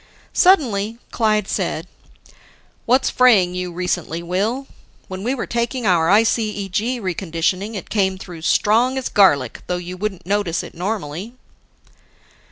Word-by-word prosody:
Suddenly, 230 - +3
Clyde 215 -3 +1
said, - - -2 1.0
"What's 255 +3 +3
fraying 210 -8 +4
you 180 0 -3
recently, 175 -1 -3
Will? 205 +10 -1 0.4
When 185 0 -6
we 250 +4 0
were 250 - -3
taking 235 +1 -2
our 170 -4 +3
ICEG 215 +1 +1
reconditioning, 185 +2 -2
it 195 - -7
came 190 -3 +1
through 175 -3 -10
strong 230 +9 +2
as 260 - -2
garlic, 145 - +3
though 180 - -1
you 180 +1 -7
wouldn't 195 -3 -4
notice 195 -3 0
it - - -10
normally." 190 +2 -4
200 Hz, 130 wpm, -20 LUFS, 180-230 Hz, 1.0 s, fraying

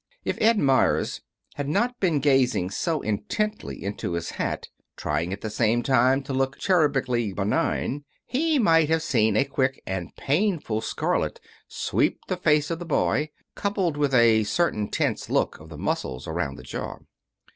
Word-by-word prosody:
If - - -2
Ed 225 +1 +5
Meyers 135 -7 +2 0.4
had 145 -1 -2
not 240 +10 0
been 165 -7 +2
gazing 130 -9 +2
so 160 +7 -1
intently 210 - -2
into 100 -3 -3
his 85 0 -3
hat, - - -3 0.3
trying 85 +2 -1
at 100 - -5
the 110 - -3
same 115 +2 +1
time 130 +1 +3
to 135 - -5
look 135 +1 0
cherubically 135 - +1
benign 140 +6 -1 0.2
he 310 +4 +1
might 165 - +4
have 160 0 +2
seen 110 -8 +2
a 140 - +3
quick 135 -1 0
and 95 -3 -4
painful 150 - 0
scarlet - - -1 0.3
sweep - - 0
the 185 - -1
face 150 -3 +2
of 165 - -2
the - - -5
boy, 155 -1 +1 0.2
coupled 195 -6 -1
with 145 -2 +1
a 115 -2 +5
certain 105 -4 0
tense - - -1
look - - 0
of 80 +1 -13
the 80 - -9
muscles 65 -2 -3
around 80 -4 -2
the - - -11
jaw. - - -5
135 Hz, 165 wpm, -25 LUFS, 110-165 Hz, 0.4 s, Ed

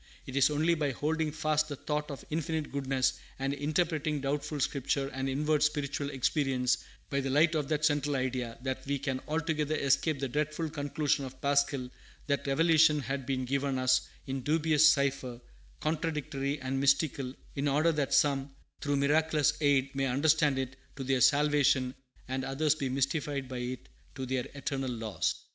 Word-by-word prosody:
It 130 - -7
is 140 +1 +5
only 155 +3 +2
by 150 -3 0
holding 155 +3 -1
fast 155 0 0
the 145 - -4
thought 150 +2 -3
of 140 - -7
Infinite 160 -1 -2
Goodness, 135 -2 0 0.2
and 135 +1 -1
interpreting 150 +1 0
doubtful 145 +2 -2
Scripture 135 0 0
and 135 0 -3
inward 150 +3 +1
spiritual 145 -1 0
experience 130 -2 +1 0.3
by 140 - +1
the 135 0 -2
light 155 +4 +4
of 150 -3 0
that 155 -1 +1
central 145 -1 +1
idea, 130 -3 -2
that 130 -1 -3
we 140 0 0
can 135 -1 -2
altogether 155 -1 -1
escape 140 +2 +1
the 135 - -1
dreadful 155 +4 -2
conclusion 145 0 0
of 130 0 -8
Pascal, 140 -2 +1 0.4
that 140 0 -1
revelation 155 +1 +4
has 135 +1 -2
been 130 -1 -1
given 140 +1 -1
us 130 0 +3 0.2
in 135 0 -3
dubious 155 +2 +4
cipher, 135 -4 0 0.4
contradictory 150 -3 -2
and 130 0 -2
mystical, 140 -1 +1 0.2
in 140 +1 -1
order 150 +4 +3
that 150 -4 -1
some, 135 -1 +2 0.3
through 145 -1 0
miraculous 150 +1 +2
aid, 140 -2 +2
may 135 0 0
understand 145 +2 +3
it 130 0 -3 0.2
to 135 - -5
their 130 -1 +1
salvation, 140 -2 +3 0.3
and 130 0 -2
others 140 +3 +1
be 140 -4 -3
mystified 140 +1 -1
by 125 -1 -5
it 125 0 -5 0.3
to 130 -2 -4
their 130 -1 -2
eternal 135 -1 -3
loss. 110 -3 -2
140 Hz, 165 wpm, -30 LUFS, 135-150 Hz, 0.4 s, is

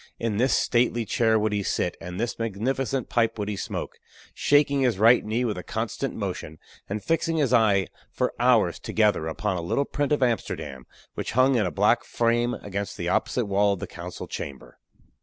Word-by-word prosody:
In 115 -3 -2
this 130 +4 +3
stately 120 -1 +1
chair 110 +1 +2
would 110 0 0
he 105 - 0
sit, 90 -2 -1
and 90 +1 -6
this 120 +1 -2
magnificent 120 +4 -1
pipe 115 -1 +1
would 105 -1 -3
he 105 - -2
smoke, - - -5 0.3
shaking 140 -1 +3
his 125 -6 +2
right 115 +4 +6
knee 115 +4 -1
with 105 -6 -2
a - - -7
constant - - -3
motion, 80 +1 -5 0.3
and 105 0 -3
fixing 165 +2 0
his 140 -5 +1
eye 105 -5 +4 0.2
for - - -1
hours - - +3
together 105 -7 +1
upon 95 +4 -2
a - - -3
little 90 +12 0
print 145 +1 -2
of 145 -3 +2
Amsterdam 70 - -2 0.3
which - - -4
hung 130 +3 +4
in 110 -6 +2
a - - -3
black - - +3
frame 120 +1 +1
against 100 0 -4
the - - -2
opposite 125 - 0
wall 100 0 +2
of 100 - -5
the - - -4
council 90 0 -8
chamber. 70 -2 -8
110 Hz, 195 wpm, -25 LUFS, 100-125 Hz, 0.3 s, right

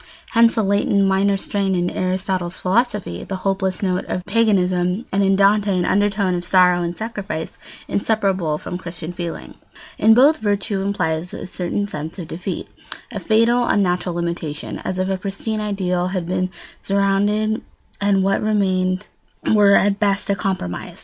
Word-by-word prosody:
Hence, 230 0 +4
a 220 - +3
latent 200 0 +2
minor 195 +1 +2
strain 195 -1 -1
in 175 0 0
Aristotle's 185 -1 -2
philosophy, 195 - 0
the 190 - -5
hopeless 190 0 0
note 185 -1 0
of 180 - -4
paganism, 185 -2 +1
and 200 +1 +2
in 195 0 +3
Dante 200 0 +3
an 175 - +1
undertone 200 -1 +1
of 175 0 -2
sorrow 180 0 +4
and 170 0 -3
sacrifice, 205 -8 -5 0.3
inseparable 195 -7 0
from 180 +3 -6
Christian 170 -1 -7
feeling. 170 -1 -6 0.5
In 220 +1 +6
both, 280 +6 +6
virtue 205 -2 -1
implies 180 -4 -2
a - - -6
certain 185 +2 -2
sense 155 -3 -6
of 175 -4 -6
defeat, 180 +3 -5 0.4
a - - -4
fatal 235 +2 +3
unnatural 180 -3 +1
limitation, 170 -3 -4
as 185 - -4
if 185 0 0
a 190 0 -1
pristine 200 +3 -3
ideal 185 -4 -1
had 185 -2 -2
been 185 +1 -1 0.3
surrendered 205 +2 +1 0.4
and 200 -1 +3
what 195 +1 +1
remained 190 -2 0 0.5
were 205 -2 +6
at 200 0 +3
best 200 -1 +1
a - - +2
compromise. 190 - -4
195 Hz, 155 wpm, -20 LUFS, 180-205 Hz, 0.5 s, In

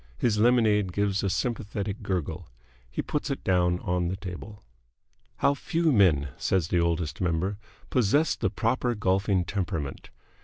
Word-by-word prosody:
His 105 - +1
lemonade 110 -5 +3
gives 100 0 +1
a 100 - +1
sympathetic 105 -1 -2
gurgle. 90 -4 -3 0.4
He - - -3
puts - - -2
it - - -3
down 90 -1 +2
on 90 0 0
the 90 - -2
table. 100 +2 -8 0.7
How 140 - +3
few 165 +3 0
men, 85 - +4
says 90 -4 0
the 90 - +2
Oldest 85 -1 -1
Member, 90 +3 0 0.3
possess 130 +7 +3
the - - 0
proper 120 +1 0
golfing 95 -2 +1
temperament! 80 -9 -3
95 Hz, 145 wpm, -27 LUFS, 90-110 Hz, 0.7 s, men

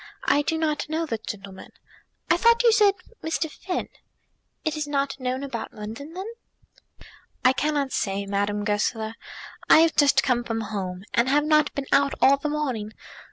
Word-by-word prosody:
I 290 - +3
do 320 +3 -1
not 305 -2 -1
know 320 +1 -1
the 230 -8 -3
gentleman. 195 -3 -9 0.5
I - - +4
thought 465 +6 +4
you 470 - +6
said 415 -3 +4 0.3
Mr. 320 -1 -2
Finn." 360 +2 -4 0.8
"It 315 0 0
is 305 -1 -3
not 280 -1 -1
known 255 +1 -2
about 265 -5 -6
London, 225 +9 -8
then?" 375 +2 -5 1.2
"I 255 - +6
cannot 290 -1 -1
say, 200 0 -1
Madame 205 +1 -1
Goesler. 220 +1 -1 0.6
I 320 - +8
have 330 -1 +3
just 285 -2 +4
come 245 -2 +1
from 225 -1 -3
home, 190 -4 -5
and 235 +2 +2
have 295 +2 +3
not 305 -1 +3
been 280 - -3
out 280 0 +3
all 275 +1 +5
the 300 +2 -3
morning. 255 -8 -3
275 Hz, 170 wpm, -25 LUFS, 220-305 Hz, 1.2 s, I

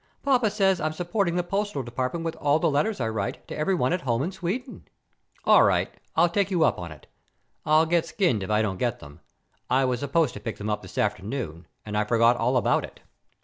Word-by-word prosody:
Papa 250 -5 +3
says 195 -3 +2
I'm 155 0 -1
supporting 175 +2 -1
the 180 - +1
postal 195 -5 -2
department 130 +7 -3
with 165 - -2
all 145 +1 +2
the 160 0 +1
letters 200 +10 0
I 115 - 0
write 110 -3 -4
to - - -6
everyone 155 -3 +1
at 180 - -1
home 120 -2 0
in 175 - -2
Sweden." 195 +8 -5 0.6
"All - - +7
right, - - +2 0.2
I'll 170 +2 +5
take 195 +3 0
you 175 -4 +2
up - - +2
on 85 -2 -6
it. 75 -3 -13 0.6
I'll 155 +1 +5
get 170 0 +1
skinned 170 - +1
if 95 - -5
I 105 +1 +2
don't 95 -4 -2
get 120 -2 0
them. 70 +2 -13 0.5
I 130 +1 +3
was 125 -2 0
supposed 145 0 +1
to - - -7
pick 105 +1 -5
them 105 +1 -3
up 105 - -2
this - - -12
afternoon 100 - -2 0.2
and 105 -1 -5
I 105 - +2
forgot 115 +2 +3
all 125 +2 +1
about 120 - +2
it." - - -11
145 Hz, 225 wpm, -25 LUFS, 110-175 Hz, 0.6 s, All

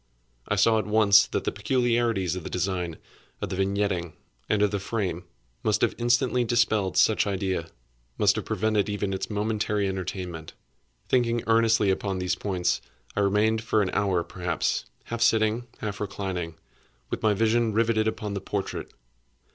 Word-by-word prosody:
I 105 - +1
saw 110 +2 +4
at 110 - -3
once 105 -1 +6
that - - -2
the - - -1
peculiarities 115 -4 +1
of 95 - -5
the - - -6
design, 90 -3 -2 0.4
of 100 - -4
the 95 - -3
vignetting, 95 -3 -1 0.4
and 105 -1 +3
of 105 - +2
the 100 - -1
frame, 95 -4 -3 0.4
must - - +1
have - - +2
instantly 120 +1 +2
dispelled 110 -5 +1
such 105 +3 +4
idea—must 85 -11 -2
have - - -3
prevented 110 -1 0
even 100 -1 -2
its 95 - -3
momentary 105 -1 0
entertainment. 90 -3 -5 0.5
Thinking 120 -2 +1
earnestly 115 -2 +3
upon 95 0 -2
these 90 -1 0
points, 90 -1 -1 0.3
I - - 0
remained, 105 +2 +2
for 110 -2 +2
an 95 - -2
hour 95 -4 +1
perhaps, 90 -2 -2 0.2
half 115 0 -5
sitting, 115 +1 +2
half 105 -2 -4
reclining, 95 -5 -4 0.6
with - - -3
my 110 -1 +3
vision 115 +2 +2
riveted 110 0 +2
upon 105 -2 -3
the 100 - -3
portrait. 100 0 -4
105 Hz, 155 wpm, -26 LUFS, 95-110 Hz, 0.6 s, once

